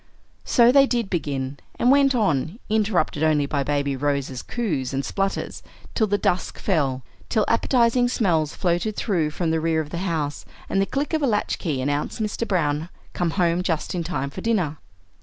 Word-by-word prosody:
So 240 -1 +5
they 275 +1 +6
did 235 -6 -1
begin, 140 -5 -2 0.2
and 245 - +4
went 275 -1 +4
on, 170 - 0
interrupted 205 -9 +1
only 155 -2 +3
by 140 0 -1
Baby 140 -1 0
Rose's 140 -2 -1
coos 150 - -2
and 135 +1 -1
splutters, 195 0 -2 0.3
till 220 - +2
the 205 0 +1
dusk 180 -2 -1
fell, 140 -9 0 0.3
till 220 -3 +2
appetizing 240 +1 +3
smells 165 - +1
floated 180 +4 0
through 170 -8 0
from 160 +1 -2
the 160 0 +1
rear 160 0 +1
of 155 -1 -4
the 170 - -3
house, 160 -6 -2 0.2
and 195 - +1
the 195 - +1
click 285 +7 -2
of 315 - +1
a 280 - +2
latch 210 -3 0
key 150 -8 -2
announced 145 - -2
Mr. 220 +1 -2
Browne, 160 -3 0 0.2
come 175 -1 0
home 175 -1 +2
just 165 -4 -2
in 175 -2 -2
time 150 -5 -3
for - - -7
dinner. 180 -10 0
170 Hz, 185 wpm, -23 LUFS, 145-215 Hz, 0.3 s, they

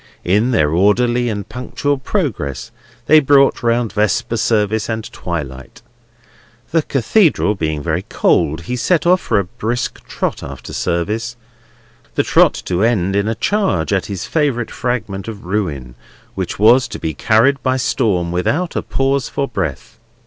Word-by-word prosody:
In 105 +7 +2
their 80 -12 +2
orderly 120 +7 +2
and 100 -3 -4
punctual 135 +3 -2
progress 125 - -3 0.3
they 155 +1 +7
brought 140 -1 +4
round 115 -1 0
Vesper 105 +2 0
Service 110 -1 0
and 110 0 -2
twilight. 70 - -6 0.9
The 165 0 +3
Cathedral 145 - +2
being 80 -6 -3
very 85 +1 -1
cold, 80 +3 +1
he 125 +9 -4
set 160 +6 +1
off 180 +1 +4
for - - 0
a 100 - +2
brisk 120 +5 -4
trot - - -3
after - - -8
service; 110 +7 -2 0.8
the - - +2
trot - - +4
to 90 0 -1
end 100 -5 +1
in 100 +1 +1
a 115 - -1
charge 150 - 0
at 95 - 0
his 95 -4 -4
favourite 140 -7 0
fragment 115 -6 -3
of 110 -5 -8
ruin, 80 - -3 0.4
which - - -4
was 115 +4 +5
to 105 - -7
be 80 -5 -3
carried 115 - +3
by 130 0 +1
storm, 100 -9 0
without 145 - -1
a - - 0
pause 135 0 -1
for 140 - -2
breath. 85 - -4
110 Hz, 155 wpm, -17 LUFS, 90-130 Hz, 0.9 s, they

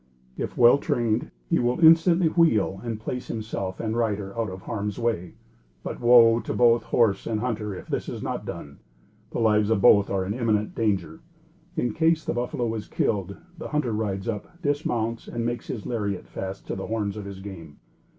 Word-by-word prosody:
If - - -5
well 120 +3 +7
trained, 115 -3 0 0.2
he - - +2
will 125 +4 0
instantly 165 +2 +6
wheel 110 - +2
and 115 -2 -4
place 125 +3 -5
himself 105 -4 -4
and 110 0 -2
rider 105 -4 -1
out 115 -2 -1
of 95 0 -9
harm's 105 -2 -3
way; 110 -8 -2 0.5
but, - - -5
woe 120 -1 +6
to - - -4
both 120 -1 +5
horse 105 -5 +2
and 110 -2 -1
hunter 110 -4 -3
if - - -9
this - - -3
is - - -6
not - - -3
done. 70 -1 -8 0.5
The - - -5
lives 105 -2 +3
of 110 -3 +2
both 100 +1 +6
are 95 -1 0
in 100 - -2
imminent 110 -3 0
danger. 95 -8 -1 0.6
In 120 -8 0
case 160 +2 +2
the - - -1
buffalo 120 -1 -2
is 110 -2 -5
killed, 100 -2 -1 0.2
the - - -5
hunter 150 -6 -1
rides 100 -2 -2
up, 115 - -5
dismounts 120 -6 -1
and 115 -1 -3
makes 120 -1 -3
his 110 -5 -5
lariet 100 -5 -3
fast 95 0 -6
to - - -4
the 95 - -5
horns 105 -3 -2
of 105 -2 -6
his 100 -1 -8
game. 85 -7 -10
110 Hz, 190 wpm, -25 LUFS, 100-120 Hz, 0.6 s, well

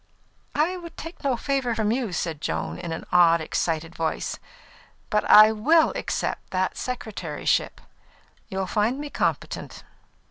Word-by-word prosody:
"I 330 +5 +1
would 335 -2 -10
take 330 +2 -9
no 265 -3 +1
favour 265 -3 -1
from 215 -1 +1
you," 240 -4 -1
said 165 -4 -3
Joan, 80 - -3
in 170 - -5
an 160 - -5
odd, 170 -2 +6
excited 165 +1 -2
voice. 160 -1 -2 0.7
"But 210 - +2
I 215 +1 +9
will 310 +10 +4
accept - - -3
that 185 0 -1
secretaryship; 210 -11 -2 0.7
you'll 190 0 -2
find 215 +7 0
me 290 0 -6
competent." - - -3
210 Hz, 140 wpm, -25 LUFS, 165-265 Hz, 0.7 s, I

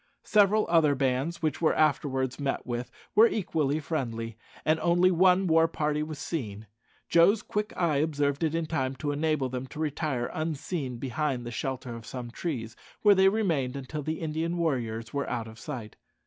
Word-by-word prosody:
Several 210 0 +4
other 160 -4 +4
bands 135 +5 -1
which 155 0 0
were 160 - +3
afterwards 135 -4 +1
met 140 -1 -2
with 120 0 -3 0.2
were 220 +3 +7
equally 155 -9 0
friendly, 115 -8 -3 0.3
and 155 +1 +3
only 175 +2 +4
one 185 +2 +4
war 165 -1 +4
party 150 -2 -1
was 155 0 -4
seen. 110 -11 -4 0.4
Joe's 185 +6 +5
quick 210 +1 -2
eye 165 -5 +2
observed 145 -1 0
it 160 0 +1
in 165 -1 0
time 135 -5 -1
to 145 +2 -2
enable 150 -2 0
them 130 +1 -5
to 150 - -10
retire 150 -5 -1
unseen 155 -4 -3
behind 130 0 -2
the 120 - -5
shelter 130 -1 -4
of 115 -1 -9
some 125 -2 -6
trees, 120 -7 -4 0.3
where 205 -1 +8
they 190 0 +5
remained 165 -12 0
until 140 +3 -5
the 155 +3 -3
Indian 160 +2 -2
warriors 120 -8 -2
were 140 0 -2
out 115 -2 -3
of 110 +1 -12
sight. 120 -8 -7
150 Hz, 175 wpm, -28 LUFS, 130-165 Hz, 0.4 s, where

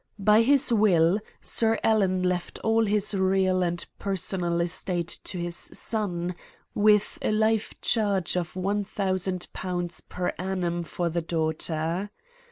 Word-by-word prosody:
By 210 +2 +5
his 265 0 +3
will, 190 -4 +4 0.2
Sir 225 -1 +2
Alan 190 -4 +2
left 180 -1 -1
all 225 0 +3
his 210 +1 +2
real 190 -1 +2
and 175 -1 -1
personal 180 -3 -1
estate 175 0 -1
to 185 - -3
his 175 0 -3 0.2
son, 180 -5 -2 0.4
with 210 0 +3
a - - 0
life 220 0 +1
charge 200 -7 +1
of 175 -2 -2
£1,000 185 -3 -2
per 180 0 -2
annum 180 -2 -1
for 170 +1 -3
the 170 +1 -1
daughter. 160 +3 -1
185 Hz, 125 wpm, -26 LUFS, 175-210 Hz, 0.4 s, By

